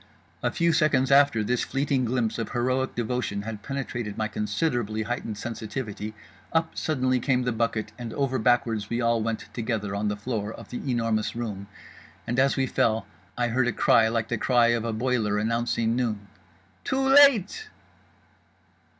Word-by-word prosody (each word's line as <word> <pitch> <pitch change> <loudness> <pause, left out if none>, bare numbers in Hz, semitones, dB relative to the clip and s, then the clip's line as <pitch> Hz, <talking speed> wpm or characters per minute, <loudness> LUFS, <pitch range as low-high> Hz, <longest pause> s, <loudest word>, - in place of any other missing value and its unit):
A - - +1
few 170 -1 +1
seconds 145 -5 +2
after 140 -5 +5
this 125 +3 0
fleeting 135 -1 0
glimpse 115 -2 -1
of 115 - -4
heroic 130 +2 0
devotion 120 -3 -2
had 110 -1 -6
penetrated 120 -6 -4
my 110 - 0
considerably 110 0 -1
heightened 110 -2 -4
sensitivity—UP 110 - -5
suddenly 130 -4 0
came 125 0 +1
the 125 - 0
bucket 115 -1 -1
and 120 -2 -5
over 135 -2 0
backwards 115 -3 +1
we 115 - -1
all 115 -1 +2
went 115 0 -2
together 110 -4 -2
on 100 +1 -1
the 105 0 -1
floor 105 -1 -3
of - - -11
The 125 - -4
Enormous 115 -3 0
Room. 105 -4 -5 0.6
And 120 +2 -1
as 135 +1 +3
we 135 - +2
fell 110 -4 +1 0.3
I 120 -1 +1
heard 120 +1 +1
a - - +2
cry 110 0 +4
like 115 0 -1
the 120 - -1
cry 120 -1 +4
of 120 -1 +1
a 115 - -1
boiler 110 -2 0
announcing 115 +1 0
noon— 110 -5 -2 0.6
"Too 260 - -1
late!" 275 - +5
120 Hz, 165 wpm, -26 LUFS, 110-130 Hz, 0.6 s, after